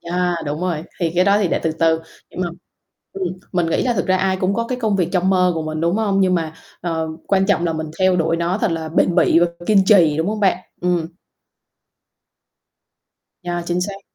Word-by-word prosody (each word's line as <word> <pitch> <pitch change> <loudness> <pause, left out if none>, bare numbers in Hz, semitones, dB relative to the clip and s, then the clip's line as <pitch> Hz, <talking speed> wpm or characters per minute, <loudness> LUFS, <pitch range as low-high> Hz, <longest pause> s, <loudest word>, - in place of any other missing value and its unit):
yeah, 175 0 -1
đúng 150 +2 -3
rồi, 175 -4 -2 0.2
thì 165 -2 0
cái 180 - +3
đó 200 +1 +4
thì 200 -4 +1
để - - 0
từ 160 - 0
từ, 160 0 +2 0.3
nhưng - - -6
mà, 175 - 0 0.6
ừm, 390 -1 -4 0.3
mình 175 -2 +1
nghĩ 165 - 0
là 250 - +1
thực 185 - -1
ra 185 - +3
ai 190 0 +1
cũng 190 +1 +1
có 230 +2 -1
cái 255 -1 -2
công 215 -4 +1
việc 180 -3 +1
trong 185 0 +2
mơ 180 -1 +3
của 160 - -2
mình, 155 0 -4
đúng 170 +4 +1
hông? 200 -3 +1
Nhưng 185 -1 +3
mà, 160 -2 -2 0.3
ờ, 165 -2 -2 0.2
quan 195 -1 +2
trọng 195 -4 +2
là 165 - 0
mình 160 0 -4
theo 185 -1 +4
đuổi 165 -1 +1
nó 170 +3 -1
thật 215 - 0
là 160 -1 -3
bền 170 +2 +2
bỉ 175 - +4
và 175 - +4 0.2
kiên 200 -3 +4
trì, 170 -8 +5
đúng 160 +2 0
hông 215 0 -3
bạn? 190 -3 +3 0.2
Ừm. 175 -2 0 2.4
Yeah, 175 0 -3
chính 175 +1 -1
xác. 195 +1 -4
180 Hz, 230 wpm, -20 LUFS, 165-195 Hz, 2.4 s, trì